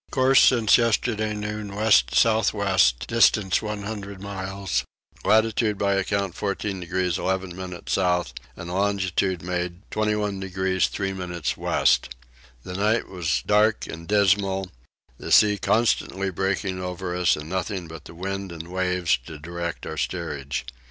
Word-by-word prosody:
Course 130 0 +4
since 115 -4 +5
yesterday 110 -2 0
noon 105 -1 -5
west 100 - +3
south 110 -1 +3
west 95 - +2
distance 105 -5 +3
100 105 -2 -5
miles; 95 -2 -3 0.4
latitude 110 -1 +2
by 100 0 +1
account 100 -1 -1
14 100 0 -3
degrees 90 0 -1
11 95 -1 -2
minutes 90 -1 -6
south 90 -2 +1 0.2
and 85 0 -7
longitude 95 -2 0
made 90 +1 -3
21 105 -2 -1
degrees 95 -1 0
3 95 -1 -3
minutes 90 -3 -3
west. 65 - +1 0.5
The 90 - -7
night 105 +4 +1
was 90 -4 -1
dark 105 +1 +3
and 85 0 -8
dismal: 95 -2 +2 0.5
the - - -6
sea 105 -1 +6
constantly 100 -3 +1
breaking 95 0 -2
over 90 0 -4
us 90 -1 +3
and 75 0 -8
nothing 95 0 -3
but 80 -2 -10
the 85 - -11
wind 95 +1 -4
and 85 0 -8
waves 90 -5 +1
to 80 - -8
direct 85 +2 -5
our 80 - -6
steerage. 70 -1 -3
95 Hz, 140 wpm, -24 LUFS, 90-105 Hz, 0.5 s, sea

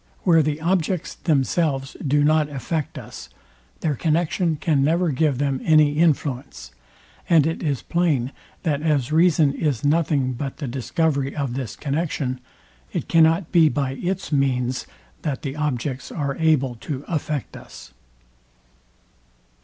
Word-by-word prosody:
Where 165 -3 +5
the 150 0 -1
objects 175 0 0
themselves 140 -2 0
do 145 +1 +2
not 155 0 +3
affect 145 +2 -3
us, - - -9 0.5
their 155 -3 +1
connexion 165 +3 0
can 150 -2 +1
never 170 +4 +2
give 145 -1 +1
them 140 -1 -1
any 155 -2 +4
influence; 135 - 0 0.6
and 160 -4 +5
it 165 +1 -2
is 145 -6 -1
plain, 150 -8 0 0.3
that 150 -4 0
as 150 -4 0
reason 160 -3 +4
is 145 -4 -1
nothing 145 -4 +2
but 135 +2 -5
the 145 - -4
discovery 135 - -1
of 140 -5 -2
this 125 -5 -4
connexion, 140 -3 -2 0.5
it - - -3
cannot 165 +1 +3
be 165 -3 +5
by 140 -3 -1
its 180 +7 -3
means 130 -3 0 0.3
that 140 -4 -3
the 140 -1 -4
objects 135 -3 -3
are 140 -3 -2
able 155 -6 +2
to 135 +4 -6
affect 150 -3 -3
us. - - -12
150 Hz, 140 wpm, -23 LUFS, 135-160 Hz, 0.6 s, Where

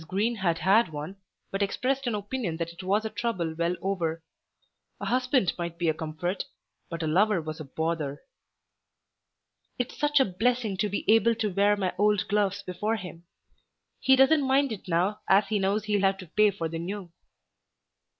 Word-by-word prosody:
Green 215 +6 0
had 175 -4 +1
had 200 +4 +4
one, 155 +5 -7 0.3
but 195 - -2
expressed 260 +6 0
an 235 - 0
opinion 205 -4 -3
that 170 0 -4
it 170 - -10
was 200 +4 +1
a - - -1
trouble 185 -9 -2
well 170 +2 0
over. 165 -4 -1 0.8
A - - -5
husband 250 -5 +2
might 170 -1 -4
be 170 -1 +1
a - - +2
comfort, 160 +4 -3 0.5
but 170 -1 -4
a - - -1
lover 195 +5 +3
was 155 0 -6
a - - -5
"bother." 155 -1 -2 1.6
"It's 245 0 -3
such 295 -1 +2
a 265 - +5
blessing 220 +2 0
to 210 +2 0
be 200 - -3
able 225 +2 +5
to 215 -3 -2
wear 200 +2 +4
my 190 -2 -1
old 210 -1 +2
gloves 205 -1 0
before 205 +4 -2
him. 175 -5 -9 0.7
He 265 - +5
doesn't 275 +3 +5
mind 270 0 +2
it 210 -3 -7
now 180 +5 +1
as 195 +1 +4
he 210 - +1
knows 195 +2 +1
he'll 210 -2 0
have 195 0 +2
to 190 - -9
pay 210 +5 +3
for 180 -5 -3
the 165 0 -5
new." 185 +1 -5
195 Hz, 185 wpm, -27 LUFS, 170-220 Hz, 1.6 s, a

